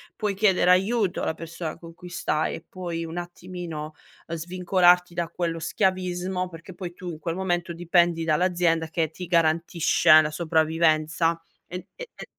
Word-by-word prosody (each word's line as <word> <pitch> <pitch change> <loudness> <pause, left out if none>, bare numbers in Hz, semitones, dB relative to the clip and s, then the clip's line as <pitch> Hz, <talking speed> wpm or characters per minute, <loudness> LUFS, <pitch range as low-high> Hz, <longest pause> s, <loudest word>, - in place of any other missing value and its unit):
puoi 210 -2 -1
chiedere 190 -3 +3
aiuto 195 +1 +2
alla - - -1
persona 165 0 -6
con 165 0 -12
cui 180 +1 -12
stai 155 -3 -1
e - - -11
poi 175 -3 -5
un 165 +1 -7
attimino 175 -3 -7 0.3
svincolarti 180 +1 +2
da 170 0 -2
quello 165 -1 -3
schiavismo, 185 0 -1
perché 170 +2 -11
poi 175 -1 -7
tu 180 0 -8
in 155 - -9
quel 165 0 -3
momento 175 -2 -1
dipendi 170 0 +2
dall'azienda 165 0 +1
che 160 -1 -1
ti 180 +2 -7
garantisce 165 -1 +4
la 155 0 -2
sopravvivenza 160 0 +1 0.3
e 180 +1 -7
e - - -9
e - - -9
175 Hz, 155 wpm, -25 LUFS, 165-180 Hz, 0.3 s, garantisce